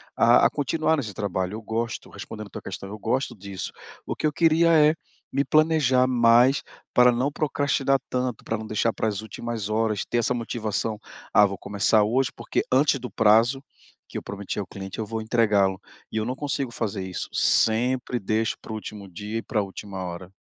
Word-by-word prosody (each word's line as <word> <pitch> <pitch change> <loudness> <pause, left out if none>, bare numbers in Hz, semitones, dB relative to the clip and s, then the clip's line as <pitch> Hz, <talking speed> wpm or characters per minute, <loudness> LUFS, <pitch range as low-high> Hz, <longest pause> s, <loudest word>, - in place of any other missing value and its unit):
a 120 +1 +5
a - - +6
continuar 155 +3 +1
nesse 110 -7 -4
trabalho. 95 -1 -2
Eu 110 - -6
gosto, 115 +1 -3
respondendo 105 -2 -8
tua - - -7
questão, 95 - -7
eu 105 +1 -8
gosto 120 +2 -1
disso. 100 -2 -6 0.3
O - - -3
que 155 - 0
eu - - 0
queria 165 +1 +4
é 155 0 +6 0.4
me 140 +1 +1
planejar 155 -5 +3
mais 120 +2 +5 0.3
pra 125 0 +6
não 130 +4 0
procrastinar 140 -2 +1
tanto, 125 -2 -2
pra 115 - -2
não 110 0 -7
deixar 110 +1 0
para 110 - -1
as 105 -1 -2
últimas 110 -1 -5
horas, 110 -2 0
ter 120 - -1
essa 120 +2 +1
motivação: 110 -2 -2 0.3
"Ah, 105 +1 +7
vou 95 -1 -6
começar 105 +2 +2
hoje, 120 +5 +1
porque 115 - -2
antes 140 +1 +4
do 125 - -6
prazo 115 +6 +4 0.5
que - - -6
eu - - -3
prometi 100 +1 -5
ao 100 - -4
cliente 95 +1 -8
eu 110 - -1
vou 110 0 -3
entregá-lo". 105 -5 +2 0.3
E 110 - -3
eu 110 - 0
não 125 +2 -2
consigo 140 -2 -2
fazer 105 -4 -3
isso, 90 - -5
sempre 125 +2 +2
deixo 110 +2 0
para - - -9
o - - -3
último 105 -2 -7
dia 105 +5 -5
e - - -8
pra 105 - 0
última 95 -1 -7
hora. 90 +1 -7
115 Hz, 195 wpm, -25 LUFS, 105-130 Hz, 0.5 s, Ah